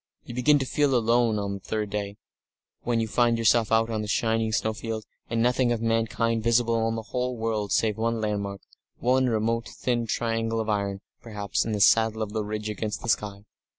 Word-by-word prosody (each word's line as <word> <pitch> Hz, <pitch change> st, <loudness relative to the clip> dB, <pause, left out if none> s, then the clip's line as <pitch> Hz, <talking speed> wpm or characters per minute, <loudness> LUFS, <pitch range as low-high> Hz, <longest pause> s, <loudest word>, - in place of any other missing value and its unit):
You -, -, -9 dB
begin 145 Hz, +5 st, +4 dB
to 135 Hz, -, -1 dB
feel 140 Hz, 0 st, +1 dB
alone 115 Hz, -1 st, +2 dB
on 100 Hz, -1 st, -2 dB
the 100 Hz, -, -5 dB
third 105 Hz, +1 st, -3 dB
day, 100 Hz, 0 st, -3 dB, 0.6 s
when 120 Hz, -1 st, 0 dB
you 115 Hz, -, 0 dB
find 120 Hz, +1 st, +2 dB
yourself 115 Hz, 0 st, +3 dB
out 115 Hz, +1 st, +3 dB
on 110 Hz, -1 st, -1 dB
some 105 Hz, -, -4 dB
shining 110 Hz, +1 st, +1 dB
snowfield, 110 Hz, 0 st, -2 dB, 0.2 s
and 115 Hz, 0 st, +1 dB
nothing 125 Hz, 0 st, +2 dB
of 120 Hz, -, 0 dB
mankind 115 Hz, 0 st, 0 dB
visible 115 Hz, -1 st, +2 dB
in 115 Hz, -, -1 dB
the 115 Hz, -, -4 dB
whole 125 Hz, +2 st, -3 dB
world 110 Hz, -2 st, -2 dB
save 110 Hz, -2 st, +1 dB
one 115 Hz, 0 st, 0 dB
landmark, 100 Hz, -2 st, -3 dB, 0.4 s
one 130 Hz, +1 st, +2 dB
remote 115 Hz, +1 st, 0 dB
thin 120 Hz, -2 st, -1 dB
red 115 Hz, -, -3 dB
triangle 115 Hz, 0 st, -1 dB
of 110 Hz, -1 st, -2 dB
iron, 100 Hz, -2 st, -1 dB, 0.2 s
perhaps, 105 Hz, -3 st, -2 dB
in 115 Hz, -, -2 dB
the 105 Hz, -, -1 dB
saddle 110 Hz, +1 st, +4 dB
of 105 Hz, -1 st, -6 dB
the 110 Hz, -1 st, -1 dB
ridge 105 Hz, +1 st, -4 dB
against 105 Hz, 0 st, -4 dB
the 115 Hz, -, -4 dB
sky. 105 Hz, -2 st, -1 dB
115 Hz, 205 wpm, -26 LUFS, 105-115 Hz, 0.6 s, begin